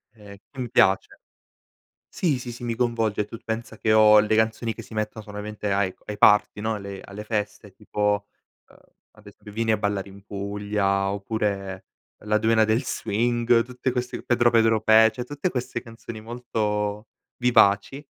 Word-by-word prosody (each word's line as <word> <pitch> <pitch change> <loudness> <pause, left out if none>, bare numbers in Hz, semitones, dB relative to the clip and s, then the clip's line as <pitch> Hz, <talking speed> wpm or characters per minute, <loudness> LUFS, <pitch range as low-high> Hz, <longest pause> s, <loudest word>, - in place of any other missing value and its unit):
ehm, 105 -2 -13 0.2
che 135 - -10
mi 120 - -4
piace. 105 -6 +2 0.9
Sì, 155 -8 0
sì, 125 -1 -7
sì, 120 - -11
mi 120 -1 -2
coinvolge 115 -3 0
e - - -5
tu 115 +2 -9
pensa 110 0 -5
che 110 - +1
ho 105 -1 +7
le 105 +1 +1
canzoni 110 +1 0
che 115 - -9
si 110 - -16
mettono 110 0 -3
solamente 105 0 -5
ai 100 -1 0
co - - -31
ai 105 -1 -6
party, 105 0 +4
no, 110 +1 -1
alle 100 -2 -7
alle 105 +1 -9
feste 105 -1 -4
tipo, 105 0 -1 0.4
ehm, - - -20 0.4
ad 105 -1 -21
ese 100 +1 -13
"Vieni 110 +1 0
a - - +3
ballare 100 -1 -2
in 100 0 -14
Puglia" 100 -1 -1
oppure 100 -2 -3 0.4
"La 105 0 +1
Dueña 110 0 +3
del 110 +5 +1
Swing" 115 +1 +1
tutte 125 +1 -3
queste 125 0 -4
"Pedro 120 -1 +3
Pedro 115 -1 +3
Pe", 110 0 +6
cioé 125 - -5
tutte 145 +7 -3
queste 125 -4 -3
canzoni 115 -1 -10
molto 105 -2 -3 0.3
vivaci. 125 +3 +3
110 Hz, 175 wpm, -24 LUFS, 105-115 Hz, 0.9 s, ho